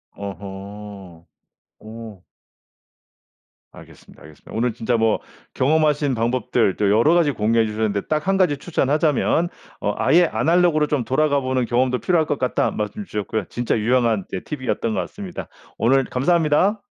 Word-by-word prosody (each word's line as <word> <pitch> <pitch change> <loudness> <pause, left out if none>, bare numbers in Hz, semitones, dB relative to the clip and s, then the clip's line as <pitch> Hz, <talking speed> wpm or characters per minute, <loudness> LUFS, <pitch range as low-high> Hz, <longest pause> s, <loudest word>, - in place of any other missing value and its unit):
어허. 100 -2 -9 0.5
오. 110 -3 -11 1.5
알겠습니다, - - -16
알겠습니다. 75 0 -15
오늘 115 0 0
진짜 120 +1 -1
뭐 110 -1 +2 0.3
경험하신 145 -1 +2
방법들 120 -3 0
또 105 - +1
여러 115 +10 +4
가지 165 -4 +3
공유해 115 -1 +1
주셨는데 105 -1 -1
딱 155 - +1
1 195 - +3
가지 175 -7 +2
추천하자면 155 +2 +1 0.3
어 105 - -1
"아예 175 +1 +4
아날로그로 165 -2 +2
좀 145 -5 0
돌아가 145 +1 +2
보는 130 -2 -1
경험도 125 +2 +1
필요할 165 -4 +1
것 145 - -1
같다." 125 - 0
말씀 105 - -4
주셨고요. 105 - -3
진짜 120 -1 -1
유용한 115 -2 +1
네 95 - -4
팁이었던 130 -5 -3
것 - - -1
같습니다. 195 -3 -7 0.3
오늘 135 +4 +3
감사합니다. 170 - +2
125 Hz, 340 characters per minute, -21 LUFS, 105-150 Hz, 1.5 s, 여러